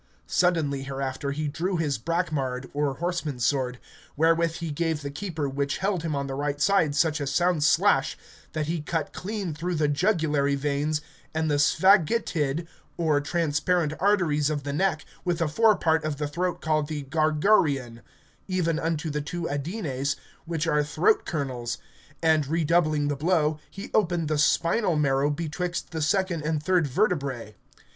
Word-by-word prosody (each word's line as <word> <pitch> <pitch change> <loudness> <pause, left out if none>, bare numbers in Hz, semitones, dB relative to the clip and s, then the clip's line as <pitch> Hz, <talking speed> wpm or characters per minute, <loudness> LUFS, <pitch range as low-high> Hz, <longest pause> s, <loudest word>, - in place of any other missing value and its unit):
Suddenly 160 -6 +1
hereafter 135 0 -3
he 150 +2 -2
drew 175 +6 -1
his 145 -6 -1
brackmard 140 -5 -2
or 145 -1 0
horseman's 160 -8 -2
sword, 130 -3 0 0.4
wherewith 165 +1 +3
he 165 -2 -4
gave 160 0 -1
the 140 - -4
keeper 160 -2 -3
which 140 +1 -2
held 190 -3 0
him 160 -2 -2
on 140 0 -1
the 135 - -4
right 145 +1 -2
side 160 -4 +3
such 155 0 +2
a 140 - -2
sound 175 +2 +2
slash 145 - +3 0.4
that 155 -1 -1
he 165 +1 -2
cut 155 0 -3
clean 200 -3 -4
through 175 +4 -3
the 155 -1 +2
jugulary 150 -4 +1
veins 145 +2 -1 0.3
and 160 -1 0
the 145 - +2
sphagitid 165 -2 +3 0.3
or 155 -4 +2
transparent 160 +1 0
arteries 170 -7 +2
of 145 -2 -2
the 140 0 -3
neck, 160 -1 0 0.2
with 175 -2 0
the 165 - +1
fore 220 +8 +4
part 160 -2 +1
of 155 -2 -2
the 150 0 -2
throat 175 +4 -2
called 155 -2 +1
the 150 -2 -4
gargareon, 150 - +2 0.5
even 170 -4 0
unto 160 -1 -2
the 150 +1 -2
two 170 +3 -4
adenes, 145 - -2 0.3
which 165 -1 -2
are 150 -2 +2
throat 410 - +2
kernels; 130 -6 -3 0.5
and, 155 -3 +3
redoubling 155 -1 +2
the 145 - 0
blow, 155 0 +1
he 195 - -9
opened 175 -6 +1
the 155 -1 +1
spinal 170 +5 +2
marrow 140 -1 +2
betwixt 170 +4 -3
the 160 -2 -3
second 185 0 +1
and 150 -1 -1
third 180 -3 +2
vertebrae. 140 - -1
155 Hz, 165 wpm, -26 LUFS, 145-170 Hz, 0.5 s, fore